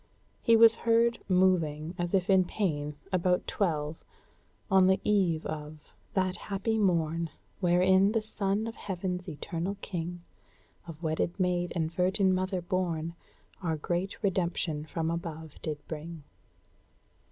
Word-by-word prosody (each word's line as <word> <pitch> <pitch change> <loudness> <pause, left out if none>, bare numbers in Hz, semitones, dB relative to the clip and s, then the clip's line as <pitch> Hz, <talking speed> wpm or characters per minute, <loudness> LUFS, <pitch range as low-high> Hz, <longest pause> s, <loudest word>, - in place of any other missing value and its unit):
He 230 - +5
was 225 0 +7
heard 235 0 +3
moving, 170 -4 +2
as 175 +1 -1
if 185 -1 +1
in 190 -2 +5
pain, 150 -7 -2 0.2
about 180 -1 +2
twelve, 155 -5 -1 0.7
on 190 -1 +6
the 190 0 +4
eve 185 -6 +2
of 150 0 -7 0.2
"That 185 -1 +1
happy 210 +3 -1
morn 165 -4 +1 0.3
Wherein 190 +2 +4
the 225 - +2
Son 210 -1 0
of 230 - -4
Heaven's 180 -2 -4
eternal 170 +5 -4
King, 175 -1 -5 0.6
Of 165 0 -9
wedded 160 +4 -1
maid 180 -1 +1
and 160 -1 -1
virgin 185 +2 +2
mother 185 -1 -1
born, 170 -3 -1 0.5
Our 165 -3 0
great 175 +7 -3
redemption 175 -5 0
from 160 +1 -2
above 160 -3 -6
did 155 -2 -3
bring." 160 0 -7
180 Hz, 130 wpm, -29 LUFS, 165-190 Hz, 0.7 s, was